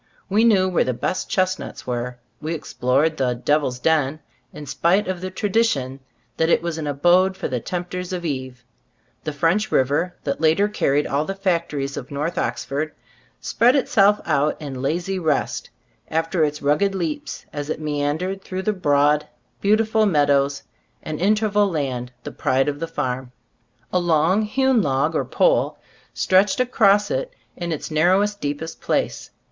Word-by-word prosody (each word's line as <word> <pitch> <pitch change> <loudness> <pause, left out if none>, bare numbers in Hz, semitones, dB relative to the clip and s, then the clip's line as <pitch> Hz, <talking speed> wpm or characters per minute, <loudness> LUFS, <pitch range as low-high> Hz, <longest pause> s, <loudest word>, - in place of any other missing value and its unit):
We 210 +3 +3
knew 195 -5 +4
where 185 - +2
the 125 - -2
best 185 +9 -2
chestnuts 185 0 -1
were. 125 0 -3 0.2
We 160 +2 -2
explored 145 +2 0
the 125 -2 0
"Devil's 135 0 0
Den," 155 +1 +1 0.3
in 150 -1 -9
spite 175 +9 +1
of 185 -2 -3
the 185 - -3
tradition 185 - 0 0.4
that 160 0 +2
it 170 - +3
was 170 -2 -3
an 150 - -4
abode 175 +6 +3
for - - -3
the 125 -2 -2
tempters 180 +5 -5
of 180 -2 -4
Eve. 130 -4 -4 0.6
The 155 - -1
"French 165 +8 +1
River," 145 +7 +1
that 140 +1 -3
later 160 +6 +4
carried 145 -8 +1
all 140 +2 0
the 195 +4 -4
factories 170 -8 -1
of 130 - -6
North 150 +4 -2
Oxford, 140 +6 -2 0.5
spread 245 +3 +3
itself 210 -6 +4
out 150 -1 +1
in 135 -4 -6
lazy 175 +7 -1
rest, 145 -8 -1 0.4
after 165 +1 0
its 150 -1 -2
rugged 195 +8 +2
leaps, 165 -5 -4
as 145 0 -5
it 155 - -2
meandered 155 +6 -2
through 190 0 -5
the 215 - +1
broad, 150 -4 +2 0.3
beautiful 215 +1 +3
meadows 145 -4 +2 0.4
and 155 +1 -5
inter 215 +3 +3
val 205 -1 +2
land, 130 -7 -3
the - - -6
pride 135 +2 +1
of 145 0 -2
the 165 - -3
farm. 125 -3 -3 0.6
A 180 - +3
long 175 +3 +2
hewn 260 +2 +2
log 145 0 +1
or - - 0
pole - - +2 0.3
stretched 200 +8 +2
across 210 -5 +3
it - - -2 0.2
in 175 -1 -4
its 160 0 -4
narrowest, 190 +6 +2
deep 145 +2 -2
est 160 0 -8
place. - - -1
160 Hz, 165 wpm, -22 LUFS, 145-190 Hz, 0.6 s, knew